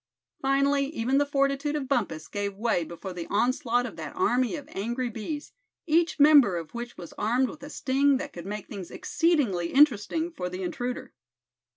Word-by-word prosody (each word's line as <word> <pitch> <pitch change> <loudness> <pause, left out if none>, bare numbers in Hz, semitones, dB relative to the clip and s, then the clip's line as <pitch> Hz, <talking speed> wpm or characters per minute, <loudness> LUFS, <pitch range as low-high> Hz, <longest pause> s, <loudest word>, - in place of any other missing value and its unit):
Finally 275 0 +2
even 270 -1 0
the 285 - +1
fortitude 275 +1 +1
of 280 -3 -2
Bumpus 205 - -1
gave 200 -1 -3
way 215 -4 +1
before 170 +3 -7
the 175 -2 -6
onslaught 245 +2 +1
of 225 - -7
that 155 -3 -7
army 250 +5 +1
of 290 -2 -8
angry 240 +3 -2
bees, 290 +8 -5 0.3
each 330 0 +2
member 285 - +7
of 165 -2 -7
which 240 0 -6
was 170 -2 -9
armed 245 +4 +2
with 300 - -10
a 285 - -8
sting 275 -1 +2
that 275 - -6
could 175 +1 -8
make 210 0 -5
things 195 -4 -7
exceedingly 290 - +1
interesting 295 +4 +3
for 180 - -4
the 185 +1 -5
intruder. 245 +8 -4
250 Hz, 180 wpm, -27 LUFS, 200-285 Hz, 0.3 s, member